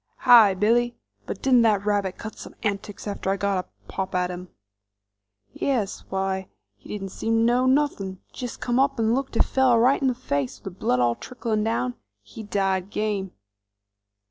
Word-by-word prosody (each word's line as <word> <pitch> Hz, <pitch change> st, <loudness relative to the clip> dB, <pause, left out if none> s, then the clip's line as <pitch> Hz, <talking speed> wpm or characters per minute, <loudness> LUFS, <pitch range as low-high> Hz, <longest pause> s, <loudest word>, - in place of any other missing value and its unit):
"Hi, 230 Hz, -6 st, +7 dB
Billy, 235 Hz, +5 st, +2 dB, 0.3 s
but -, -, -6 dB
didn't 255 Hz, -3 st, +5 dB
that 210 Hz, -3 st, +2 dB
rabbit 200 Hz, -3 st, 0 dB
cut 220 Hz, -, -7 dB
some -, -, -11 dB
antics 205 Hz, -1 st, -3 dB
after 200 Hz, -1 st, -3 dB
I 195 Hz, -, +1 dB
got 195 Hz, -1 st, 0 dB
a -, -, -32 dB, 0.2 s
pop 190 Hz, -1 st, -4 dB
at 180 Hz, 0 st, +1 dB
him?" 180 Hz, 0 st, -8 dB, 1.0 s
"Yes; 230 Hz, -8 st, -2 dB
why, 190 Hz, -1 st, -2 dB, 0.3 s
he -, -, -17 dB
didn't 195 Hz, -2 st, -5 dB
seem 225 Hz, +4 st, -2 dB
to 225 Hz, -, +3 dB
know 245 Hz, +2 st, +3 dB
nothin', 260 Hz, -9 st, +1 dB
jest 245 Hz, -2 st, -6 dB
come 245 Hz, +1 st, +1 dB
up 275 Hz, -1 st, +2 dB
'nd 225 Hz, 0 st, +2 dB
looked 270 Hz, +1 st, -2 dB
a -, -, +5 dB
fellow 260 Hz, -3 st, +3 dB
right 255 Hz, +5 st, +4 dB
in 270 Hz, -, +2 dB
the 255 Hz, -, +1 dB
face 140 Hz, -, -2 dB
with -, -, -26 dB
the -, -, -23 dB
blood 125 Hz, -, +1 dB
all 120 Hz, -1 st, +3 dB
tricklin' 225 Hz, -, -3 dB
down. 125 Hz, -, 0 dB, 0.3 s
He 105 Hz, -, -10 dB
died 195 Hz, -2 st, -1 dB
game." 205 Hz, -3 st, -2 dB
210 Hz, 185 wpm, -24 LUFS, 190-240 Hz, 1.0 s, Hi